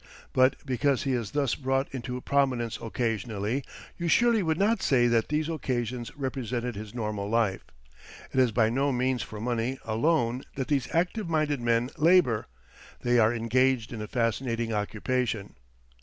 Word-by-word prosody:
But 130 Hz, +1 st, +4 dB
because 135 Hz, +1 st, +1 dB
he 135 Hz, -, 0 dB
is 115 Hz, -5 st, -2 dB
thus 140 Hz, +1 st, 0 dB
brought 135 Hz, 0 st, 0 dB
into 125 Hz, -1 st, -4 dB
prominence 125 Hz, -6 st, 0 dB
occasionally, 115 Hz, +1 st, -2 dB, 0.4 s
you 170 Hz, -, -1 dB
surely 235 Hz, +4 st, +4 dB
would 160 Hz, -3 st, 0 dB
not 205 Hz, +3 st, +2 dB
say 125 Hz, -3 st, +3 dB
that 115 Hz, -2 st, +2 dB
these 150 Hz, +1 st, 0 dB
occasions 125 Hz, -6 st, -2 dB
represented 125 Hz, -3 st, -3 dB
his 105 Hz, +2 st, -8 dB
normal 105 Hz, -3 st, -3 dB
life. 110 Hz, -4 st, +1 dB, 0.7 s
It 130 Hz, -, +2 dB
is 125 Hz, -2 st, +4 dB
by 110 Hz, 0 st, +2 dB
no 140 Hz, +3 st, +1 dB
means 125 Hz, -1 st, 0 dB
for 105 Hz, -, -7 dB
money 120 Hz, +3 st, -1 dB
alone 120 Hz, +1 st, +1 dB
that 135 Hz, -2 st, -3 dB
these 140 Hz, -4 st, +1 dB
active 180 Hz, +3 st, 0 dB
minded 155 Hz, -4 st, 0 dB
men 120 Hz, +2 st, +1 dB
labour 160 Hz, -9 st, +4 dB, 0.5 s
they 120 Hz, 0 st, +3 dB
are 110 Hz, 0 st, +5 dB
engaged 120 Hz, +1 st, +1 dB
in 110 Hz, -, -5 dB
a 105 Hz, -, -5 dB
fascinating 115 Hz, 0 st, -1 dB
occupation. 110 Hz, +1 st, -2 dB
125 Hz, 155 wpm, -28 LUFS, 115-140 Hz, 0.7 s, are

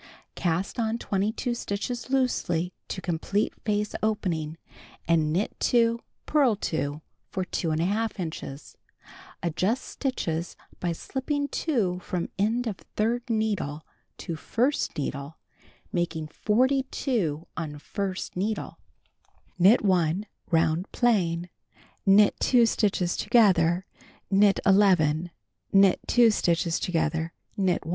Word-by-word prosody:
Cast 180 Hz, +6 st, -1 dB
on 225 Hz, 0 st, 0 dB
22 220 Hz, +4 st, -1 dB
stitches 235 Hz, +2 st, -4 dB
loosely 185 Hz, -10 st, 0 dB
to 185 Hz, -, -5 dB
complete 185 Hz, +4 st, -1 dB
face 210 Hz, -1 st, 0 dB
opening, 170 Hz, -8 st, -1 dB, 0.5 s
and 160 Hz, -2 st, +3 dB
knit 185 Hz, +7 st, -1 dB
2, 230 Hz, -1 st, +3 dB, 0.3 s
purl 275 Hz, -7 st, +3 dB
2 150 Hz, -5 st, -3 dB, 0.3 s
for 185 Hz, -1 st, -2 dB
2h 180 Hz, +8 st, -1 dB
inches 155 Hz, -4 st, -6 dB, 0.7 s
(adjust 185 Hz, +9 st, 0 dB
stitches 170 Hz, -, -3 dB, 0.2 s
by 175 Hz, -, -1 dB
slipping 285 Hz, -, -2 dB
2 215 Hz, -, 0 dB
from 180 Hz, -1 st, -3 dB
end 225 Hz, +5 st, +1 dB
of 210 Hz, -5 st, -3 dB, 0.2 s
third 235 Hz, +3 st, 0 dB
needle 205 Hz, -9 st, -1 dB, 0.3 s
to 170 Hz, -, -5 dB
first 250 Hz, -, 0 dB
needle, 140 Hz, +1 st, -4 dB, 0.6 s
making 170 Hz, -3 st, -1 dB
42 235 Hz, -, 0 dB
on 155 Hz, -3 st, -4 dB
first 190 Hz, +5 st, -4 dB
needle). 210 Hz, +4 st, -3 dB, 0.8 s
Knit 205 Hz, +5 st, +6 dB
1 180 Hz, 0 st, +2 dB, 0.2 s
round 165 Hz, +1 st, +1 dB
plain. 180 Hz, -8 st, +1 dB, 0.6 s
Knit 200 Hz, +1 st, +6 dB
2 245 Hz, -2 st, +5 dB
stitches 195 Hz, -6 st, +1 dB
together, 185 Hz, -6 st, +3 dB, 0.5 s
knit 200 Hz, 0 st, +5 dB
11, 180 Hz, -5 st, +4 dB, 0.4 s
knit 195 Hz, -1 st, +5 dB
2 240 Hz, -2 st, +5 dB
stitches 170 Hz, -4 st, +1 dB
together, 160 Hz, -1 st, -1 dB, 0.2 s
knit 190 Hz, -5 st, 0 dB
1. -, -, -6 dB
190 Hz, 110 wpm, -27 LUFS, 165-225 Hz, 0.8 s, Knit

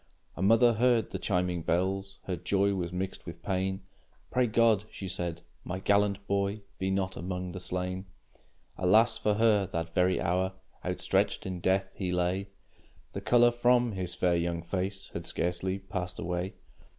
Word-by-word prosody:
A -, -, -6 dB
mother 115 Hz, +4 st, +5 dB
heard 120 Hz, 0 st, +2 dB
the -, -, -3 dB
chiming 90 Hz, -3 st, 0 dB
bells; 95 Hz, +4 st, -1 dB
Her 95 Hz, -, -2 dB
joy 100 Hz, +4 st, +1 dB
was 90 Hz, -3 st, -2 dB
mixed 95 Hz, +1 st, -4 dB
with -, -, -8 dB
pain. 95 Hz, +1 st, -1 dB, 0.5 s
"Pray 125 Hz, -1 st, +3 dB
God," 110 Hz, -2 st, +3 dB
she 95 Hz, -, -7 dB
said, 85 Hz, -2 st, -3 dB, 0.2 s
"my 90 Hz, -, -4 dB
gallant 100 Hz, +1 st, +2 dB
boy 100 Hz, +1 st, -1 dB, 0.2 s
Be 95 Hz, -, 0 dB
not 95 Hz, -1 st, -1 dB
among 90 Hz, 0 st, -4 dB
the 95 Hz, -, -6 dB
slain!" 90 Hz, +1 st, -3 dB, 0.7 s
Alas 110 Hz, +6 st, +4 dB
for 105 Hz, -1 st, +2 dB
her! 105 Hz, -3 st, +3 dB
that 85 Hz, -2 st, -4 dB
very 90 Hz, +1 st, +3 dB
hour 95 Hz, +2 st, 0 dB, 0.3 s
Outstretched -, -, 0 dB
in 95 Hz, -1 st, -4 dB
death 95 Hz, +2 st, +1 dB
he 95 Hz, -3 st, -2 dB
lay, 90 Hz, +2 st, 0 dB, 0.6 s
The -, -, -4 dB
color 120 Hz, 0 st, +5 dB
from 120 Hz, 0 st, +3 dB
his 95 Hz, -3 st, -3 dB
fair, 90 Hz, -1 st, +2 dB
young 85 Hz, 0 st, -1 dB
face 95 Hz, +2 st, -3 dB
Had 85 Hz, 0 st, -6 dB
scarcely 90 Hz, +2 st, -1 dB
passed 95 Hz, -2 st, -5 dB
away. 90 Hz, +3 st, -3 dB
95 Hz, 160 wpm, -30 LUFS, 90-100 Hz, 0.7 s, mother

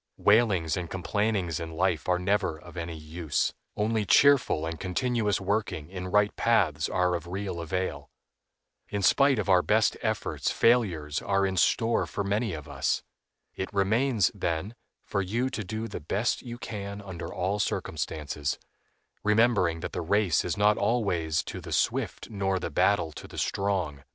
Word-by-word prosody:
Wailings 100 Hz, -7 st, +3 dB
and 90 Hz, -3 st, -4 dB
complainings 95 Hz, -3 st, -1 dB
in 80 Hz, -1 st, -6 dB
life 85 Hz, -2 st, 0 dB
are 90 Hz, -, +4 dB
never 90 Hz, -3 st, 0 dB
of 85 Hz, +2 st, -14 dB
any 85 Hz, -2 st, -5 dB
use; 80 Hz, 0 st, -2 dB, 0.2 s
only 110 Hz, +1 st, +1 dB
cheerful 135 Hz, -, +4 dB
and 80 Hz, 0 st, -4 dB
continuous 105 Hz, +1 st, 0 dB
working 100 Hz, -5 st, -2 dB
in 90 Hz, -1 st, -5 dB
right 105 Hz, +2 st, +2 dB
paths 85 Hz, -10 st, +2 dB
are 90 Hz, -1 st, +1 dB
of 85 Hz, -1 st, -3 dB
real 95 Hz, -1 st, -4 dB
avail. 90 Hz, +3 st, -3 dB, 0.8 s
In 100 Hz, -1 st, -2 dB
spite 140 Hz, +5 st, +5 dB
of 105 Hz, -, -1 dB
our 95 Hz, -2 st, +5 dB
best 110 Hz, +3 st, +2 dB
efforts -, -, -1 dB
failures 90 Hz, -12 st, +2 dB
are 100 Hz, 0 st, +1 dB
in 95 Hz, -1 st, -1 dB
store 115 Hz, +7 st, +2 dB
for 100 Hz, -, -3 dB
many 100 Hz, +1 st, 0 dB
of 75 Hz, -3 st, -7 dB
us. -, -, -1 dB, 0.5 s
It 95 Hz, -, -4 dB
remains, 110 Hz, +1 st, +2 dB
then, 85 Hz, +6 st, -2 dB, 0.3 s
for 100 Hz, -, -1 dB
you 120 Hz, +8 st, -1 dB
to 110 Hz, -, -3 dB
do 110 Hz, +4 st, -4 dB
the -, -, -6 dB
best 100 Hz, +10 st, 0 dB
you 120 Hz, -2 st, -7 dB
can 100 Hz, -3 st, -6 dB
under 85 Hz, -4 st, -7 dB
all 95 Hz, +3 st, -1 dB
circumstances, 75 Hz, -7 st, -2 dB, 0.7 s
remembering 105 Hz, -6 st, +3 dB
that -, -, -4 dB
the 90 Hz, -, -3 dB
race 95 Hz, 0 st, +2 dB
is -, -, -2 dB
not 105 Hz, +1 st, +4 dB
always 95 Hz, -8 st, +1 dB
to -, -, -7 dB
the -, -, -9 dB
swift -, -, 0 dB
nor 95 Hz, -2 st, 0 dB
the 85 Hz, -, -4 dB
battle 85 Hz, 0 st, +2 dB
to -, -, -10 dB
the -, -, -12 dB
strong. 90 Hz, -8 st, -1 dB
95 Hz, 165 wpm, -28 LUFS, 85-105 Hz, 0.8 s, spite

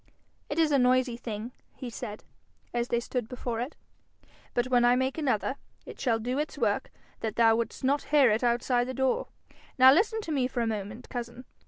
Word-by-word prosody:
'It -, -, -3 dB
is 320 Hz, -2 st, +3 dB
a 280 Hz, -, +4 dB
noisy 250 Hz, -1 st, +3 dB
thing,' 230 Hz, -1 st, -6 dB, 0.2 s
he 255 Hz, -, -7 dB
said, 215 Hz, -2 st, -7 dB, 0.5 s
as 240 Hz, 0 st, 0 dB
they 235 Hz, -, +1 dB
stood 240 Hz, -1 st, -4 dB
before 245 Hz, -2 st, -4 dB
it, 250 Hz, +6 st, -4 dB, 0.8 s
'but 240 Hz, -, +2 dB
when 245 Hz, -1 st, +3 dB
I 240 Hz, 0 st, +5 dB
make 260 Hz, +1 st, 0 dB
another, 270 Hz, -2 st, 0 dB, 0.3 s
it -, -, -10 dB
shall 235 Hz, -4 st, +1 dB
do 250 Hz, +5 st, -2 dB
its 300 Hz, -, -3 dB
work -, -, 0 dB, 0.3 s
that 220 Hz, -2 st, -3 dB
thou 225 Hz, -1 st, +5 dB
wouldst 230 Hz, +3 st, -3 dB
not 280 Hz, +2 st, +1 dB
hear 285 Hz, -6 st, +5 dB
it 220 Hz, +3 st, 0 dB
outside 245 Hz, +1 st, +1 dB
the 260 Hz, -, -4 dB
door. 265 Hz, 0 st, +1 dB, 0.5 s
Now 260 Hz, 0 st, +9 dB
listen 440 Hz, +7 st, +2 dB
to 330 Hz, -, -6 dB
me 265 Hz, -4 st, +1 dB
for 250 Hz, -2 st, -3 dB
a -, -, +1 dB
moment, 215 Hz, +2 st, -4 dB
cousin. 240 Hz, 0 st, -6 dB
245 Hz, 200 wpm, -28 LUFS, 235-265 Hz, 0.8 s, Now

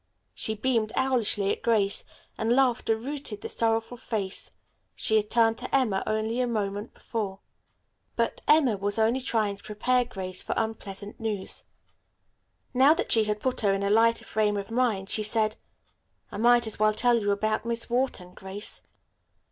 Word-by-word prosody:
She 220 Hz, -, -2 dB
beamed 220 Hz, -1 st, 0 dB
owlishly 225 Hz, -6 st, +1 dB
at -, -, -3 dB
Grace, 210 Hz, -4 st, +1 dB, 0.3 s
and 230 Hz, +2 st, +1 dB
laughter 250 Hz, -4 st, +2 dB
routed 265 Hz, -3 st, -5 dB
the -, -, -5 dB
sorrowful 225 Hz, +1 st, 0 dB
face 205 Hz, -5 st, -3 dB, 0.5 s
she 220 Hz, -, +1 dB
had 210 Hz, -1 st, +2 dB
turned 225 Hz, -1 st, +3 dB
to 255 Hz, -, -2 dB
Emma 220 Hz, -8 st, +2 dB
only 220 Hz, +3 st, 0 dB
a 250 Hz, -, +1 dB
moment 205 Hz, -1 st, -3 dB
before. 205 Hz, -4 st, -4 dB, 0.8 s
But -, -, -1 dB
Emma 275 Hz, -9 st, +4 dB
was 205 Hz, +2 st, -1 dB
only 225 Hz, +3 st, +2 dB
trying 215 Hz, -5 st, -1 dB
to -, -, -21 dB
prepare 250 Hz, +4 st, +1 dB
Grace 185 Hz, -5 st, -5 dB
for -, -, -3 dB
unpleasant 205 Hz, -2 st, -4 dB
news. 215 Hz, -4 st, -4 dB, 1.1 s
Now 270 Hz, +5 st, +6 dB
that -, -, -3 dB
she 220 Hz, -1 st, +5 dB
had 210 Hz, 0 st, -1 dB
put 255 Hz, +2 st, -1 dB
her 200 Hz, -2 st, +3 dB
in 195 Hz, -, -2 dB
a 200 Hz, -, +1 dB
lighter 230 Hz, +2 st, +3 dB
frame 210 Hz, -1 st, 0 dB
of 200 Hz, +2 st, -5 dB
mind, 225 Hz, -6 st, 0 dB
she 215 Hz, -, +3 dB
said: 215 Hz, 0 st, +2 dB, 0.8 s
"I -, -, -6 dB
might 240 Hz, +2 st, +5 dB
as 220 Hz, -, -3 dB
well 215 Hz, 0 st, +3 dB
tell 240 Hz, +1 st, +4 dB
you 205 Hz, -, -1 dB
about 215 Hz, +2 st, 0 dB
Miss 235 Hz, 0 st, -1 dB
Wharton, 240 Hz, -7 st, -1 dB
Grace." 195 Hz, +3 st, -6 dB
220 Hz, 170 wpm, -27 LUFS, 205-240 Hz, 1.1 s, Now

